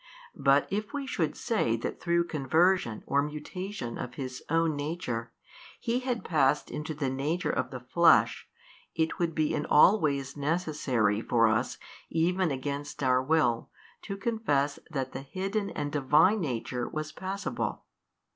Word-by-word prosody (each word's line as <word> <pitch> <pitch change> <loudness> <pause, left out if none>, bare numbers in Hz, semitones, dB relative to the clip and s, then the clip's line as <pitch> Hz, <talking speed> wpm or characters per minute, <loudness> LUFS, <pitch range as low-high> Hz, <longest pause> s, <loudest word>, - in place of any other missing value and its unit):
But 140 0 +3
if 210 +1 -2
we 285 -1 -2
should 165 - -1
say 205 - +1
that 115 - -4
through 170 0 +2
conversion 160 - +1
or 140 +1 +2
mutation 150 - -5
of 125 0 -5
His 130 -2 -5
own 165 -1 +2
Nature 145 -6 -3 0.5
He 240 +1 0
had 250 -2 -3
passed 150 -3 +2
into 155 +1 -4
the 140 -2 -1
nature 145 +7 -1
of 130 0 -1
the 125 -1 -7
flesh 165 +8 +4 0.5
44, 160 - +4
it 160 - -8
would 170 -2 0
be 155 -1 +1
in 150 - -2
all 190 +8 +6
ways 140 -4 -1
|233 - - -15
necessary 140 - 0
for 115 -1 +3
us 110 +3 0 0.3
even 180 +2 +1
against 140 +1 -4
our 130 -1 +4
will 130 -5 +1 0.3
to 195 -1 -5
confess 195 -11 0
that 135 -4 -3
the 130 - -6
Hidden 195 +8 -3
and 145 -1 -3
Divine 150 +9 +4
Nature 125 - -3
was 155 0 -4
passible. 190 +3 -4
150 Hz, 155 wpm, -29 LUFS, 130-180 Hz, 0.5 s, all